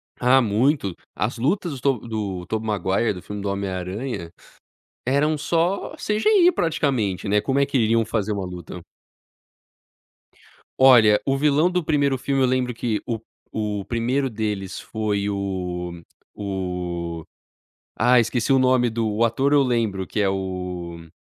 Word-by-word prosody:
Ah, 130 +2 +4
muito. 110 - +1 0.2
As 105 +5 -2
lutas 150 - -1
do 135 -4 +1
To - - -12
do 100 -5 -4
Tobey 110 0 -2
Maguire, 100 +2 0
do 90 - -9
filme 105 -1 -7
do 100 - -2
homem 100 0 -2
aranha, 95 0 -4 0.8
eram 150 +3 +2
só 170 +6 0
CGI 350 - +3
praticamente, 130 - 0
né? 105 +1 +3
Como 135 +4 0
é 140 - +4
que 140 -2 0
iriam 115 0 +3
fazer 110 -2 -1
uma 100 -2 -3
luta? 90 -1 -8 2.0
Olha, 115 -6 +7
o 135 - +1
vilão 150 +5 +3
do 180 -2 0
primeiro 140 -4 +1
filme 135 -1 0
eu - - +5
lembro 125 -1 0
que 115 -2 -2
o 115 -2 -2 0.3
o 105 -2 -2
primeiro 125 +4 0
deles 105 -4 -3
foi 105 -2 -2
o 90 -3 -4 0.3
o 90 -4 -4 0.7
Ah, 125 0 +5
esqueci 115 +2 0
o 135 - +5
nome 125 -1 +3
do 115 -1 -1
o 110 +3 +1
ator 135 +5 +1
eu 145 -1 +6
lembro 110 -7 0
que 105 - -3
é 100 - +3
o 90 -3 -5
110 Hz, 155 wpm, -23 LUFS, 95-135 Hz, 2.0 s, Olha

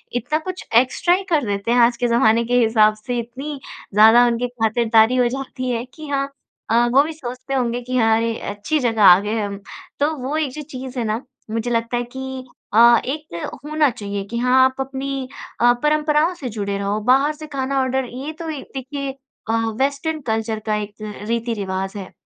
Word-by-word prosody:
इतना 290 +6 0
कुछ 370 - -6
एक्सट्रा 260 +8 +4
ही 390 - -3
कर 300 -7 +2
देते 200 +3 -2
हैं 245 - +4
आज 235 0 +4
के 245 -1 0
ज़माने 235 -1 +4
के 245 - -3
हिसाब 220 -2 +4
से। 245 +3 -4
इतनी 270 +5 -6 0.3
ज़्यादा 225 +3 +7
उनकी 240 +1 0
खातिरदारी 225 0 +2
हो 250 -1 +3
जाती 255 0 -5
है 235 -1 -1
कि 310 -2 -10
हाँ 275 -1 -1 0.4
अ, 235 +1 +4
वो 275 - +7
भी 320 +2 -5
सोचते 255 -2 -7
होंगे 245 -2 0
कि, 255 +1 -5
"हाँ, 225 -1 +4
अरे! 230 0 0 0.2
अच्छी 205 +10 -2
जगह 225 -5 +1
आ 180 -1 +9
गए 210 +2 -2
हम।" 200 -1 -3 0.4
तो 290 - +3
वो 265 +3 -3
एक 300 -4 -1
जो 300 +4 -7
चीज़ 255 0 -7
है - - 0
ना, 220 +3 -1 0.3
मुझे 230 +2 -2
लगता 230 +1 0
है 245 - -1
कि 265 -1 -6 0.3
अ, 235 +1 +7
एक 295 - -5 0.3
होना 305 -1 +2
चाहिए 200 -4 -5
कि 235 +4 -5
हाँ, 250 +2 +4
आप 260 0 0
अपनी 270 0 -4 0.3
अ, 240 0 +6
परंपराओं 300 +3 +2
से 270 -7 -6
जुड़े 200 -2 -3
रहो, 200 +1 -1
बाहर 280 +3 +3
से 310 0 -9
खाना 270 +1 0
ऑर्डर, 260 0 0
ये 265 +6 -6
तो 330 -1 -5
एक, 295 -3 -6
देखिए 275 +1 -4 0.4
अ, - - +2 0.3
वेस्टर्न 285 +3 -1
कल्चर 220 0 -1
का 215 - +1
एक 210 0 -5 0.3
रीति-रिवाज़ 205 -5 -2
है। 190 -2 -8
245 Hz, 200 wpm, -21 LUFS, 225-275 Hz, 0.4 s, आ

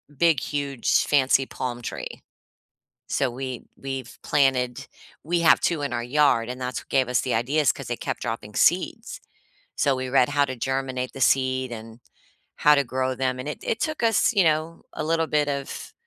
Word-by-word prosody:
big, 165 -1 +3
huge, 140 -4 0
fancy 135 -1 +3
palm 125 -2 -5
tree. - - -6 0.9
So, 135 - 0
we 130 0 -6
we've 135 -3 -6
planted 130 -4 +1 0.4
we 170 +2 0
have 165 - +6
2 165 -4 0
in 140 - -2
our 120 - -1
yard, 125 -3 +2
and 125 +1 -5
that's 125 0 -3
what - - -23
gave 130 -2 +2
us 125 - +2
the 130 - -2
ideas 140 +6 +2
'cause - - -9
they - - -3
kept - - -4
dropping - - -5
seeds. - - +1 0.6
So, 140 -2 +2
we 130 0 -4
read 125 -2 +4
how 145 0 +3
to 130 -2 -5
germinate 130 0 -2
the 135 - -8
seed 130 -1 +2
and 115 +1 -9 0.6
how 150 - +5
to 140 - +3
grow 130 +1 -1
them 130 0 -1
and 130 +3 -5
it 150 - -4
it 220 - -1
took 310 -4 -2
us, 230 +1 +3
you 200 - +5
know, 160 +1 0
a - - -3
little 165 +1 +1
bit 150 -1 +1
of 140 -1 -5
135 Hz, 190 wpm, -24 LUFS, 125-150 Hz, 0.9 s, have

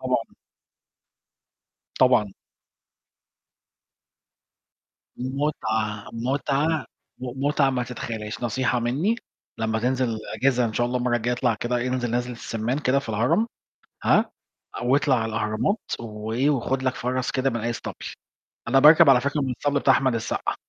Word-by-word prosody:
طبعًا. - - -2 1.6
طبعًا. 110 -6 +4 2.8
متعة، 110 -6 -2
متعة، 140 +6 0 0.3
م 130 +2 -4
متعة 145 -2 +3
ما 125 -1 -1
تتخيلهاش، 115 -2 -6
نصيحة 125 +1 0
مني 140 - +1 0.4
لمّا 110 0 0
تنزل 125 -1 0 0.2
أجازة 125 -2 +2
إن 115 - -2
شاء 120 +2 +1
الله 125 +1 -1
المرّه 120 -1 +1
الجاية 120 +1 -1
اطلع 120 -2 +1
كده، 120 +3 -2
انزل 125 -2 -1
نزلة 125 +1 -1
السمّان 115 +2 -3
كده 140 -2 +2
في 140 - -7
الهرم، 115 - +2 0.6
ها؟ - - +3 0.5
أو 125 +3 +2
اطلع 145 -3 +2
على 110 -1 -1
الأهرامات، 110 - 0 0.2
وإيه، 110 +4 -1
وخُد 130 -1 -1
لك 130 -1 0
فَرَس 125 0 -2
كده 135 0 0
من 115 - -3
أي 115 +2 -1
اسطبل، 120 - -5 0.7
أنا 135 +3 +4
باركب 150 0 +8
على 125 -2 +6
فكرة 140 +2 -1
من 135 - -1
الاسطبل 145 +3 0
بتاع 135 - +4
أحمد 130 -3 +2
السقا. 110 - -2
125 Hz, 140 wpm, -24 LUFS, 115-135 Hz, 2.8 s, باركب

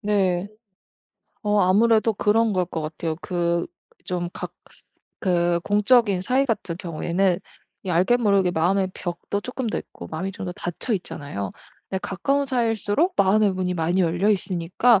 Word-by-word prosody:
네. 195 -3 +1 0.9
어 210 -1 +2
아무래도 220 +4 +4
그런 220 +2 +2
걸 185 -2 +1
것 160 - -4
같아요. 155 +1 -3
그 170 -1 -1 0.4
좀 175 -2 -3
각 - - -6 0.7
그 175 -2 +2
공적인 205 0 +3
사이 255 +8 +2
같은 205 -9 -2
경우에는 175 +1 0 0.5
이 190 - -3
알게 185 +8 +3
모르게 200 -5 +3
마음의 185 +3 +1
벽도 175 +3 -4
쪼끔 250 +3 -4
더 - - -1
있고 - - -10
마음이 185 +5 -3
좀 200 0 -7
더 180 - -4
닫혀 175 +7 -4
있잖아요. 140 - -4 0.4
근데 190 - -2
가까운 275 +9 0
사이일수록 240 - +1
마음의 200 +1 +4
문이 185 -1 -1
많이 175 +2 +1
열려 175 +4 +1
있으니까 190 +3 +2
190 Hz, 310 characters per minute, -24 LUFS, 175-215 Hz, 0.9 s, 아무래도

